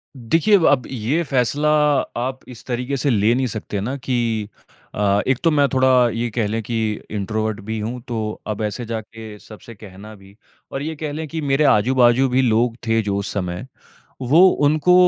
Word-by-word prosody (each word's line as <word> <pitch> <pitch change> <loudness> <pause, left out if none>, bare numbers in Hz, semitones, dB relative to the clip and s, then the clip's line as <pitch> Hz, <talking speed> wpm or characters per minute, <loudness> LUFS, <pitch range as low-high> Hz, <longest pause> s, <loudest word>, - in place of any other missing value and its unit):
देखिए 165 - +3
व 165 - +1
अब 135 -3 +3
ये 130 +7 -1
फ़ैसला 140 +2 0 0.5
आप 130 +2 -3
इस 120 - -11
तरीके 125 +2 -3
से 135 +2 0
ले 110 0 +3
नहीं 130 0 0
सकते 105 -2 -5
ना 130 +6 -3
कि 115 -5 -2 0.5
अ, 100 0 +2
एक 130 -2 +2
तो 165 - +4
मैं 145 -2 +3
थोड़ा 130 0 +2 0.2
ये 115 +1 -2
कह 115 -3 0
लें 110 +2 -2
कि 115 +2 -3 0.3
इंट्रोवर्ट 110 +1 -2
भी 110 +2 -4
हूँ 120 +4 -4
तो 115 -2 -3 0.3
अब 105 0 -3
ऐसे 105 +3 -3
जाके 110 -1 -7
सबसे 115 +2 -13
कहना 105 +1 -12
भी 95 0 -18 0.4
और 135 - -4
ये 160 +1 -4
कह 150 -1 -5
लें 155 +1 -5
कि 160 +2 -5
मेरे 140 0 +1
आजू-बाजू 125 +3 +3
भी 130 +1 +2
लोग 115 -1 +2
थे 115 0 +2
जो 100 -2 -2
उस 100 - -3
समय 90 +2 -4 0.6
वो 155 +9 +6 0.2
उनको 155 +4 +3
120 Hz, 190 wpm, -20 LUFS, 110-135 Hz, 0.6 s, वो